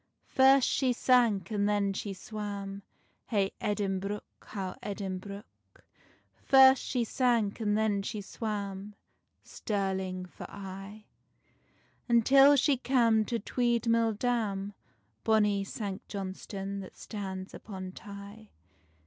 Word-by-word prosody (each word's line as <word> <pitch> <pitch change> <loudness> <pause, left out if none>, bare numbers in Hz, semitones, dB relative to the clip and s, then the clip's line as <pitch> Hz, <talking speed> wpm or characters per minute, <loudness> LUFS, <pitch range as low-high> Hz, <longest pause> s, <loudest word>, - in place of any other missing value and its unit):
First 265 0 +5
she 255 -2 +2
sank, 235 -7 +3
and 205 -1 +1
then 200 -1 +1
she 200 +1 -4
swam, 200 0 -6 0.5
Hey 200 -4 +1
Edinbruch, 205 -1 -1 0.2
how 195 -3 -5
Edinbruch. 200 0 -5 1.0
First 265 -1 +7
she 250 -3 -1
sank, 235 -3 +1
and 210 -2 +1
then 215 -2 +1
she 210 +2 -4
swam, 205 -1 -5 0.5
Stirling 190 -3 -3
for 180 - -10
aye: 195 +2 -9 1.0
Until 270 +5 +6
she 275 0 +3
cam 230 -4 +3
to 235 - -1
Tweed 235 +1 0
mill 230 -1 +3
dam, 205 -4 -1 0.5
Bonny 210 -2 +3
Sanct 195 -1 -6
Johnstonne 195 0 -5
that 190 - -10
stands 190 -3 -6
upon 190 -3 -7
Tay. 200 +2 -11
205 Hz, 110 wpm, -30 LUFS, 195-230 Hz, 1.0 s, First